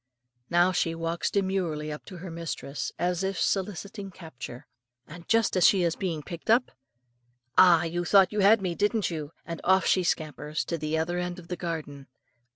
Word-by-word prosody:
Now 175 +2 +4
she 165 -2 0
walks 165 +1 -2
demurely 185 -6 -1
up 150 - -8
to 185 - -10
her 175 0 -8
mistress, 165 -4 -5
as 180 +1 0
if 190 -1 -2
soliciting 200 +1 -2
capture, 130 -9 -10 0.4
and 170 +4 -12
just 225 -3 +2
as 185 - +6
she 190 -3 +4
is 170 -1 +1
being 165 -6 -3
picked 170 +5 -9
up, 240 +3 +4 0.8
"Ah! 175 -3 +7
you 175 +1 -2
thought 190 +1 +5
you 210 - -1
had 200 +1 +5
me, 180 -2 -1
did 205 +2 0
you?" 155 -2 -5
and 170 -1 -6
off 190 +1 +4
she 185 - +3
scampers 155 -2 -2
to 170 - -3
the 155 +1 -1
other 175 +2 -1
end 180 0 -3
of 170 -2 -12
the 180 - -2
garden. 155 -5 -5
175 Hz, 185 wpm, -27 LUFS, 160-190 Hz, 0.8 s, Ah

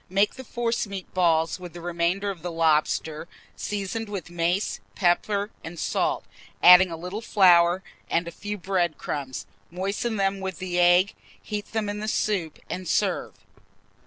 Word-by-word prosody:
Make 200 +3 +2
the 260 - -9
forcemeat 230 -6 -3
balls 165 -1 +2
with 180 -2 -9
the 175 - -8
remainder 175 +4 -1
of 180 -4 -10
the 175 +1 -4
lobster, 160 0 +1 0.3
seasoned 205 +2 -3
with 190 -4 -6
mace, 175 +3 0 0.2
pepper, 200 +3 +1
and 170 +2 -8
salt, - - 0 0.4
adding 180 +1 +9
a 165 - -5
little 180 +6 -5
flour, 180 -4 +5 0.3
and 170 +1 +1
a - - -5
few 205 +4 -5
bread 175 -3 0
crumbs; 135 -3 -4 0.2
moisten 200 +6 -2
them 195 0 +1
with 190 -2 -4
the 180 -1 -2
egg, 175 +3 +5 0.3
heat 210 -1 -5
them 220 -2 0
in 205 0 -3
the 215 - -4
soup, 195 -7 -1
and 185 0 -5
serve. - - 0
185 Hz, 160 wpm, -25 LUFS, 170-205 Hz, 0.4 s, adding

